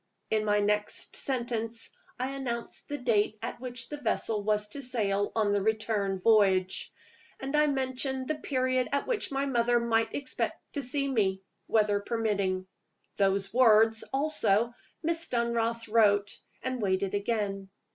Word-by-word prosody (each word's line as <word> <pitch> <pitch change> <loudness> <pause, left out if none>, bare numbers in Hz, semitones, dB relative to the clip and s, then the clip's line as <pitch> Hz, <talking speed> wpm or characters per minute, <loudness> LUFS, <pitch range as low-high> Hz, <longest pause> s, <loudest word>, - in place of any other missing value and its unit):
In 215 -1 +2
my 210 0 +3
next 210 0 -1
sentence, 235 -3 -2 0.3
I 260 +2 -1
announced 245 -4 -4
the 290 - -2
date 220 -4 +1
at - - -4
which 245 -1 -4
the 295 - -5
vessel 220 -2 0
was 210 0 0
to 280 - -7
sail 205 -6 0
on 215 -2 +2
the 205 0 +2
return 215 -2 0
voyage; 190 -2 +3 0.5
and 270 +2 -3
I 300 0 +5
mentioned 265 -1 -1
the 310 - +1
period 255 -2 0
at 280 - +1
which 480 -10 -1
my 275 0 0
mother 240 -2 +2
might 225 -1 +1
expect 275 -2 -4
to 285 - -1
see 275 +2 0
me, 195 -7 +1 0.2
weather 210 -2 +3
permitting. 200 -4 -1 0.5
Those 195 0 +1
words, 225 -2 +5
also, 240 -6 +2 0.3
Miss 335 +1 0
Dunross 235 -1 0
wrote 205 -2 +3 0.3
and 255 -2 -2
waited 190 -1 0
again. 200 -2 -1
225 Hz, 145 wpm, -29 LUFS, 205-255 Hz, 0.5 s, I